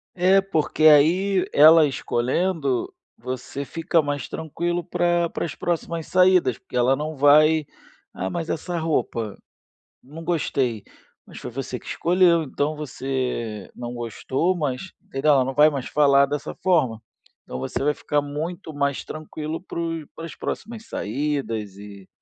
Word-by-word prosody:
É 185 +2 +4
porque 160 -5 -1
aí 180 +6 +5
ela 155 +1 +8
escolhendo, 135 +2 -1 0.2
você 130 +3 -5
fica 165 +2 0
mais 145 -3 -3
tranquilo 170 +2 -3
para 175 -1 +1
para - - -3
as 155 - -5
próximas 170 -1 -3
saídas 180 -9 +3
porque - - -10
ela 125 +2 +3
não 155 +2 -4
vai 150 +2 +5 0.5
"Ah, 95 +1 -3
mas 170 -1 -4
essa 175 +1 -3
roupa?", 120 -9 -2 0.7
"Não 150 +5 -10
gostei". 135 - -1 0.4
"Mas - - -11
foi - - -7
você 125 0 -5
que - - -19
escolheu". 175 -1 +3
"Então, 145 +2 -2
você 130 -7 -4
não 120 0 -6
gostou, 130 +9 -1
mas 150 +3 -3 0.2
legal". 145 +2 +3
Ela 130 - +3
não 135 - -4
vai 150 +2 +6
mais 135 -3 -4
falar 140 -2 +4
dessa 145 +1 -4
forma. 135 - +2 0.4
Então, 65 - -7
você 65 - -3
vai 150 +1 +2
ficar 145 0 0
muito 160 +4 -5
mais 140 -1 -1
tranquilo 155 +1 -6
pro 165 -4 -4
pras 165 0 -8
próximas 225 -1 -6
saídas 115 -4 -3
e 100 -1 -12
150 Hz, 145 wpm, -23 LUFS, 130-170 Hz, 0.7 s, ela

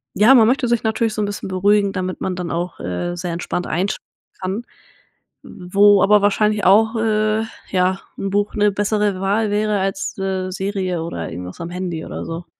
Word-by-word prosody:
ja, 220 +6 +6
man 225 -3 +6
möchte 255 +1 +2
sich 235 -1 +1
natürlich 220 0 0
so 215 - -1
'n - - +1
bisschen 205 -1 -5
beruhigen, 200 +2 +2
damit 185 -1 -4
man 185 - -2
dann 180 -2 -4
auch, 175 +1 -3
äh, 90 - -3
sehr 175 -1 -4
entspannt 175 +1 -3
einsch 185 +4 -1 0.4
kann, 190 +5 -3 0.8
wo 200 +3 +3
aber 205 +1 +5
wahrscheinlich 210 0 +2
auch, 220 +4 +5
äh, 215 0 +1 0.3
ja, 185 0 +1 0.2
'n 195 - -3
Buch 205 +2 0
'ne 210 -1 +3
bessere 205 -1 0
Wahl 205 +2 +1
wäre 210 0 +1
als, 195 +1 -3
äh, 190 -1 -2
Serie 185 -3 -2
oder 85 - -5
irgendwas 90 +2 -8
am 170 - -5
Handy 180 -3 -4
oder - - -6
so. 165 +1 -6
195 Hz, 185 wpm, -20 LUFS, 180-210 Hz, 0.8 s, ja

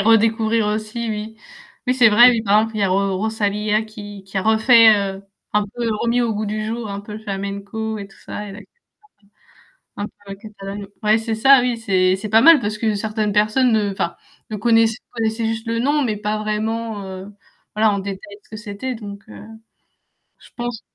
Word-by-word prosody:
redécouvrir 225 0 +3
aussi 215 +2 -3
oui. 215 +1 -5 0.5
Oui 250 - +2
c'est 250 -3 +6
vrai. 240 +4 +8
Oui, 230 -2 0
par 205 0 +4
exemple 225 0 -3
il - - -2
y - - +2
a 195 - +2
Ro 195 0 +1
Rosalia 210 0 0
qui 205 -2 -10
qui 195 +1 -9
a 190 - -1
refait, 220 0 +6
heu, 195 -1 -3 0.3
un 210 0 +3
peu 235 +3 -4
remis 235 +1 +1
au 230 -2 0
goût 215 - -2
du 215 +1 -3
jour, 225 0 -4
un 200 - -5
peu 210 +1 -11
le 215 - -6
flamenco 200 +2 -4
et 200 - -7
tout 195 - -21
ça 210 - -7
et - - -8
la 200 - -10
culture, 205 - -15 1.3
heu, - - -3
un 205 - -2 0.2
peu 195 - -6
catalane. 200 -1 -8 0.2
Ouais 215 +1 +4
c'est 225 0 -3
ça 270 +4 +6
oui, 245 -1 0
c'est 185 -4 +2
c'est 200 +3 -6
pas 220 +2 +5
mal 325 +1 +7
parce 210 -2 -3
que 220 -1 0
certaines 215 0 -2
personnes 215 +4 +3
ne 210 -2 +1
enfin, 170 -3 -2 0.4
ne 215 - -3
connaissaient 225 +1 +3
connaissaient 225 -1 -2
juste 225 +1 -3
le 230 0 -1
nom, 290 +4 +2
mais 215 -3 -1
pas 210 +1 -2
vraiment, 215 0 -3
heu, 190 +2 -8 0.4
voilà 215 0 +3
en 200 - -1
détail 200 +1 -7
ce - - -27
que 215 - -7
c'était. 215 +4 -5
Donc 205 -3 -9
heu, 100 -1 -11 1.0
je - - -18
pense 240 -2 -4
215 Hz, 210 wpm, -20 LUFS, 205-225 Hz, 1.3 s, vrai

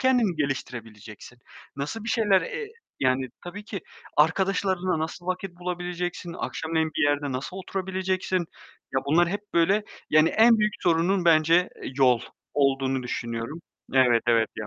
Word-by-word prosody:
kendini 245 -9 +3
geliştirebileceksin? 120 -5 -5 0.4
Nasıl 150 +11 -4
bir 230 - -4
şeyler, 210 -5 +3
eee, 455 -3 -5 0.3
yani, 130 0 +1 0.2
tabii 205 +4 -7
ki 200 -5 -5 0.4
arkadaşlarınla 185 +2 +2
nasıl 160 +3 -5
vakit 185 +1 -2
bulabileceksin? 175 -1 -4
Akşamleyin 160 -2 -2
bir 160 - +1
yerde 145 -1 +1
nasıl 135 +8 -5
oturabileceksin? 190 -1 -2 0.5
Ya, 135 - +3
bunlar 170 +4 +4
hep 200 +3 -2
böyle, 195 +5 +3 0.3
yani, 155 +1 +6
en 225 0 +5
büyük 210 0 +2
sorunun 175 +2 +2
bence 165 +2 +5 0.3
yol 125 -3 +5 0.3
olduğunu 135 -2 +1
düşünüyorum. 120 +5 -4 0.3
Evet, 125 -3 +5
evet 115 -1 +3
ya. 105 - -4
170 Hz, 135 wpm, -26 LUFS, 135-190 Hz, 0.5 s, yani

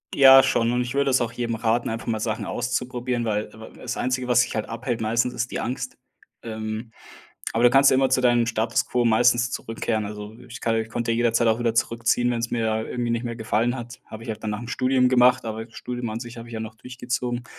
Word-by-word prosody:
Ja 135 -1 +9
schon, 115 -2 +1
und 125 0 +1
ich 125 +1 -4
würde 140 -1 +2
es 130 - +3
auch 115 -1 -1
jedem 115 0 -3
raten, 115 +1 0
einfach 115 0 -4
mal 110 -2 -1
Sachen 110 0 -2
auszuprobieren, 125 0 -2
weil 105 -1 -2
w 110 - -14 0.2
w - - -16
das 125 -1 -5
Einzige, 130 0 -1
was 120 -1 +5
dich 125 - -2
halt 110 - -2
abhält, 115 0 -3
meistens, 115 +3 0
ist 125 +2 -2
die - - -3
Angst. 130 +1 -4 0.4
Ähm, 110 0 -5 0.6
aber 115 - 0
du 120 - +7
kannst 135 +2 +6
ja - - +3
immer 135 0 +3
zu 130 - +3
deinem 120 -2 +3
Status 115 0 0
quo 125 -1 0
meistens 120 +1 +3
zurückkehren. 115 -2 -2
Also, 105 +1 -7
ich 120 0 -9
kann 115 - 0
ich 110 0 -1
konnte 115 0 -2
jederzeit 115 0 +2
auch 110 +1 +2
wieder 115 -1 +1
zurückziehen, 115 +1 +1
wenn's 115 0 -2
mir 110 -1 0
irgendwie 120 -1 -2
nicht 115 0 -1
mehr 120 -1 -4
gefallen 115 +2 0
hat. 120 0 -9
Habe 110 +1 -9
ich 115 - -3
auch - - -7
dann 110 - -4
nach 105 - -3
dem 120 - -7
Studium 130 0 +2
gemacht, 125 -1 +4
aber 110 0 -4
das 115 - -21
Studium 120 -1 -5
an 110 - -4
sich 120 0 -8
habe 115 0 -9
ich 115 - -9
ja - - -3
noch 110 0 -6
durchgezogen. 120 0 -4
120 Hz, 245 wpm, -24 LUFS, 115-125 Hz, 0.6 s, Ja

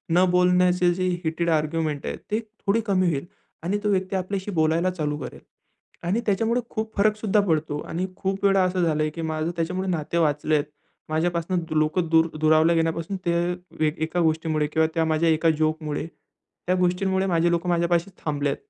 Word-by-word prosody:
न 180 - +5
बोलण्याचे 180 0 +3
जे 185 +1 -1 0.2
हीटेड 165 +1 -1
आर्ग्युमेंट 155 -1 0
आहे - - -3 0.2
ते 215 - +1
थोडी 220 0 -2
कमी 185 -3 +2
होईल, 140 -1 -2 0.4
आणि 190 +4 0
तो 210 - +1
व्यक्ती 190 0 0
आपल्याशी 190 +2 -3
बोलायला 165 +2 +2
चालू 150 -4 -2
करेल. - - -8 0.6
आणि 195 +7 0
त्याच्यामुळे 225 +4 +1
खूप 220 0 -4
फरक 210 +1 +3
सुद्धा 215 -1 +1
पडतो 155 -3 0
आणि 175 +3 -2
खूप 195 +1 -3
वेळा 195 -1 +4
असं 185 0 0
झालंय 155 -2 +1
की 165 - -4
माझं 160 +1 -2
त्याच्यामुळे 180 +3 -2
नाते 170 -1 -2
वाचलेत. 150 -1 +2 0.5
माझ्यापासून 170 +2 0
लोक 155 +3 +1
दूर 165 0 +4
दुरावला 155 +2 +4
गेल्यापासून 165 +3 -1
ते 170 - +2 0.5
एक 155 +2 -4
एका 160 +3 -1
गोष्टीमुळे 160 -2 +1
किंवा 160 +1 +2
त्या 165 -1 +1
माझ्या 160 +1 +2
एका 160 +1 +3
जोकमुळे, 155 -1 -1 0.6
त्या 180 - +3
गोष्टींमुळे 190 +1 +1
माझे 170 -2 +2
लोक 170 +1 -1
माझ्यापाशी 170 +1 +1 0.2
थांबलेत. 145 -2 -1
170 Hz, 170 wpm, -24 LUFS, 155-185 Hz, 0.6 s, न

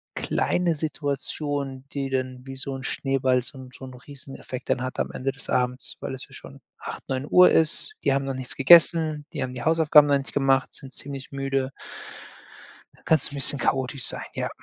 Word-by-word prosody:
kleine 175 -2 0
Situationen, 145 -2 -3
die 135 -1 -2
dann 130 -1 -3
wie 135 - -6
so 135 0 -4
'n 130 - -7
Schneeball 130 -1 +1
so 135 - -8
'n 130 - -10
so - - -12
'n 130 - -10
Rieseneffekt 130 -1 -9
dann 125 - +1
hat 130 - -5
am - - 0
Ende 135 +1 -2
des 135 - -13
Abends, 125 0 -1
weil - - -4
es 130 - -9
ja - - -19
schon - - -12 0.2
8:00, - - -7
9:00 145 +7 +5
ist. 160 - +1
Die - - +3
haben 135 0 0
noch 135 - -2
nichts 130 -1 -6
gegessen. 155 +1 +5
Die - - -4
haben 125 0 -4
die 120 - -5
Hausaufgaben 155 -2 +6
noch 140 -1 +4
nicht 135 - -7
gemacht, 135 -1 +2
sind 135 -2 -12
ziemlich 140 -1 -8
müde 135 -1 -1 1.2
da - - -24
kann's 160 - +2
'n 145 - -8
bisschen 140 0 0
chaotisch 130 +1 -1
sein, - - -5
ja. - - -2
135 Hz, 195 wpm, -25 LUFS, 130-145 Hz, 1.2 s, Hausaufgaben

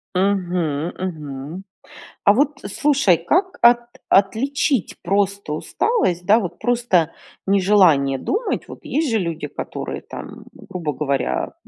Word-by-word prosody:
Мгм, 180 -5 0
мгм. 155 -1 -6 0.6
А 200 - +6
вот 275 +6 +3 0.2
слушай, 275 - +3
как 360 - 0
от 240 0 +7 0.3
отличить 240 - +2
просто 200 -3 0
усталость, 180 - 0
да 215 +5 +5
вот, 175 -5 -5
просто 235 -10 +1 0.4
нежелание 185 -9 +4
думать? 425 - -2
Вот - - -10
есть 310 -1 0
же 225 - +2
люди, 165 -5 -3
которые - - -6
там, - - -10
грубо 160 -5 -5
говоря, 135 - -1
190 Hz, 120 wpm, -21 LUFS, 160-235 Hz, 0.6 s, от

